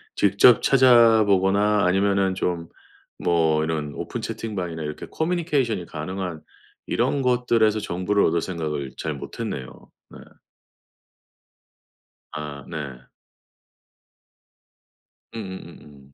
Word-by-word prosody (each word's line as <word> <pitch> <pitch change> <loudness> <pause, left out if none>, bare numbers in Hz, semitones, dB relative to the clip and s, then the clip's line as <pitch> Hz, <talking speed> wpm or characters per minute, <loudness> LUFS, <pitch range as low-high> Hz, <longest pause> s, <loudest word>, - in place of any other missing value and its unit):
직접 100 +4 +5
찾아보거나 105 -6 +4
아니면은 95 +1 +2
좀 85 -3 -2 0.5
뭐 80 -3 +2
이런 80 -2 -3
오픈 - - -5
채팅방이나 90 -7 -5
이렇게 75 -1 -6
커뮤니케이션이 150 - -1
가능한 85 +1 -5 0.5
이런 140 - 0
것들에서 120 -4 +2
정보를 100 +1 0
얻을 85 +1 +1
생각을 75 -7 -4
잘 80 - -3
못했네요. 65 -2 -7 0.2
네. - - -13 2.1
아. 75 -2 -7
네. 70 -6 -7 2.3
음음음음. 75 -9 -10
95 Hz, 225 characters per minute, -23 LUFS, 80-110 Hz, 2.3 s, 직접